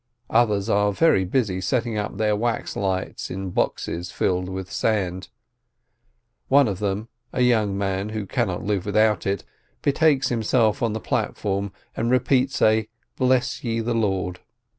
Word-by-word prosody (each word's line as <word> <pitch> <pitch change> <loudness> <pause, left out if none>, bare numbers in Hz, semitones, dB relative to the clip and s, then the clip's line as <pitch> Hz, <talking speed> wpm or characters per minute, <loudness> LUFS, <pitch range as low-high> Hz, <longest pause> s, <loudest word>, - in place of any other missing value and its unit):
Others 105 -4 +3
are 105 0 +3
very 100 - +3
busy 95 -3 0
setting 120 +1 0
up 105 -2 -3
their 105 0 +2
wax 115 +2 -2
lights 95 -1 -2
in 95 0 -4
boxes 90 0 -2
filled 90 0 0
with 95 -1 -6
sand; 95 -4 -1 1.2
one 140 -1 +5
of 95 -3 -3
them, 105 +1 -2 0.2
a 125 - -1
young 110 -5 +2
man 100 +1 -1
who 110 -1 -4
cannot - - -1
live 100 -1 -1
without 105 0 +2
it, 100 -1 -1 0.4
betakes 145 -1 +3
himself 115 -2 +2
to 115 - +1
the 110 +1 -3
platform 100 -1 -2 0.2
and 115 - -1
repeats 130 +1 +2
a 110 0 +3 0.3
"Bless 130 -1 +1
ye 115 -1 -1
the 115 +1 -1
Lord." 95 -5 -1
105 Hz, 150 wpm, -23 LUFS, 95-115 Hz, 1.2 s, one